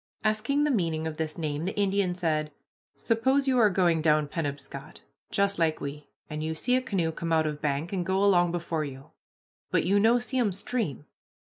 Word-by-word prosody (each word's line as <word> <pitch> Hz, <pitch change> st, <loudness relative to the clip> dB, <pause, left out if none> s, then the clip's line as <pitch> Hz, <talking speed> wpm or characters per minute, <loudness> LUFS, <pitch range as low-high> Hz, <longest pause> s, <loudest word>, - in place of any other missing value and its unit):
Asking 220 Hz, +7 st, +1 dB
the 300 Hz, -, +2 dB
meaning 165 Hz, -8 st, 0 dB
of 160 Hz, -1 st, -4 dB
this 155 Hz, -1 st, -3 dB
name, 155 Hz, -1 st, -2 dB
the 195 Hz, -, -3 dB
Indian 195 Hz, -2 st, +1 dB
said, 155 Hz, -4 st, -1 dB, 0.4 s
"Suppose 265 Hz, +5 st, +1 dB
you 255 Hz, -2 st, +3 dB
are 215 Hz, -3 st, +6 dB
going 175 Hz, -4 st, +2 dB
down 155 Hz, -1 st, +3 dB
Penobscot, 140 Hz, -2 st, -6 dB, 0.3 s
just 200 Hz, -1 st, +1 dB
like 160 Hz, -2 st, +1 dB
we, 145 Hz, +1 st, -6 dB, 0.2 s
and 150 Hz, 0 st, -5 dB
you 160 Hz, 0 st, -2 dB
see 250 Hz, +10 st, +1 dB
a 255 Hz, -, +2 dB
canoe 185 Hz, -9 st, -1 dB
come 165 Hz, +1 st, -4 dB
out 160 Hz, -1 st, +3 dB
of 150 Hz, -1 st, -3 dB
bank 150 Hz, +4 st, -1 dB
and 185 Hz, -2 st, 0 dB
go 190 Hz, +2 st, +1 dB
along 175 Hz, -4 st, +4 dB
before 170 Hz, -2 st, -2 dB
you, 135 Hz, -2 st, -9 dB, 0.6 s
but -, -, +2 dB
you 200 Hz, +3 st, +3 dB
no 225 Hz, +4 st, +5 dB
see 250 Hz, +2 st, -2 dB
'em 215 Hz, -6 st, +2 dB
stream. 195 Hz, -, -3 dB
170 Hz, 200 wpm, -28 LUFS, 155-205 Hz, 0.6 s, are